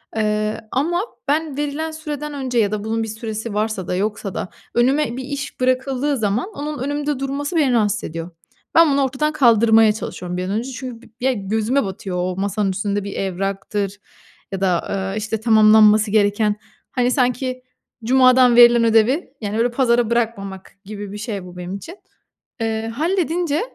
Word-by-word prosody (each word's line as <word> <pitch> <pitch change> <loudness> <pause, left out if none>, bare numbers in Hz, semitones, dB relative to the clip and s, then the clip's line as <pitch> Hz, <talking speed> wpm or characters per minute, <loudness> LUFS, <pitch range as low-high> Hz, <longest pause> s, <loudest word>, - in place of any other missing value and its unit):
Eee, 215 0 0
ama 340 +7 0 0.3
ben 295 -1 0
verilen 295 +2 -2
süreden 300 -2 -5
önce 260 -4 -1
ya 210 -2 +2
da 210 -1 -3
bunun 225 +1 -1
bir - - -4
süresi 220 0 -5
varsa 210 -3 -2
da - - -1
yoksa 200 0 -2
da, - - -4 0.3
önüme 255 +1 +2
bir 265 - -4
iş 280 0 -6
bırakıldığı 260 +2 0
zaman 220 - -1
onun 295 0 -4
önümde 290 +1 -2
durması 280 +4 -3
beni 285 -6 +3
rahatsız 215 -1 +1
ediyor. 165 +2 -6 0.4
Ben 330 -2 +6
bunu 275 0 +2
ortadan 275 +4 -1
kaldırmaya 225 -5 +5
çalışıyorum 180 -4 -5
bir 180 - -2
an 185 - -4
önce 235 +5 -2
çünkü 255 -2 -7
bi - - -17 0.2
ya, 265 - +3
gözüme 220 +6 0
batıyor. 190 -1 -5
O 180 0 -1
masanın 200 0 0
üstünde 200 +1 -2
bir 200 0 -6
evraktır 195 +1 -3 0.5
ya 195 - -4
da, 180 -3 +1 0.3
eee, 210 - -4
işte, 220 0 -3
tamamlanması 215 -1 +6
gereken, 205 0 +2 0.4
hani, 250 -1 +1
sanki 255 0 0 0.4
cumadan 255 0 +5
verilen 240 -1 +7
ödevi, 230 +7 +2
yani, 210 +1 -3
öyle, 235 +1 +2
pazara 240 -2 +2
bırakmamak 200 -5 -2
gibi 205 -1 -7
bir 205 - -6
şey 210 -3 -5
bu 180 0 -11
benim 180 +1 -5
için. 330 - -9 0.6
Eee, 225 0 -1
halledince 330 +3 0
230 Hz, 170 wpm, -20 LUFS, 205-270 Hz, 0.6 s, verilen